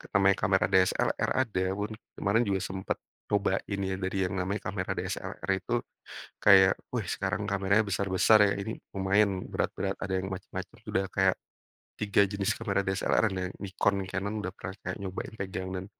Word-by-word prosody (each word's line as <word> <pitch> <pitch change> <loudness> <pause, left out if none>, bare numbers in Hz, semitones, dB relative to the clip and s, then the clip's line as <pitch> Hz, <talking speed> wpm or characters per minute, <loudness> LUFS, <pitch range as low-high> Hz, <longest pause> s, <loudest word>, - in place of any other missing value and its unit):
namanya 100 0 +5
kamera 95 0 +3
DSLR 95 -1 +2 0.2
ada 95 -4 -1
pun, 105 +2 -3 0.3
kemarin 100 +4 +3
juga 95 -1 +1
sempat 95 0 -3 0.3
cobain 100 0 0
ya, 95 0 -1
dari 95 +1 -2
yang 90 - -5
namanya 95 +3 -1
kamera 90 -2 -3
DSLR - - -4
itu. 120 +5 -2 0.7
Kayak, 95 -2 +8 0.2
"Wih, 115 -6 -1
sekarang 100 +2 -1
kameranya 100 +1 +3
besar-besar 100 +2 +4
ya, - - +2
Ini 110 +3 -3 0.2
lumayan 95 0 +2
berat-berat, 95 0 -1
ada 95 - -3
yang 95 0 -2
macem-macem." 95 -1 -6
Sudah 95 0 0
kayak 95 -1 +3 0.6
3 100 -1 +4
jenis 100 0 -1
kamera 100 -3 0
DSLR-nya 95 -1 +1
Nikon, 100 0 0
Canon 100 +2 -2
udah 95 - -3
pernah 95 +2 -6
kayak - - -3
nyobain 95 -1 -5
pegang 95 -1 -4
dan 95 0 -4
95 Hz, 160 wpm, -29 LUFS, 95-100 Hz, 0.7 s, Kayak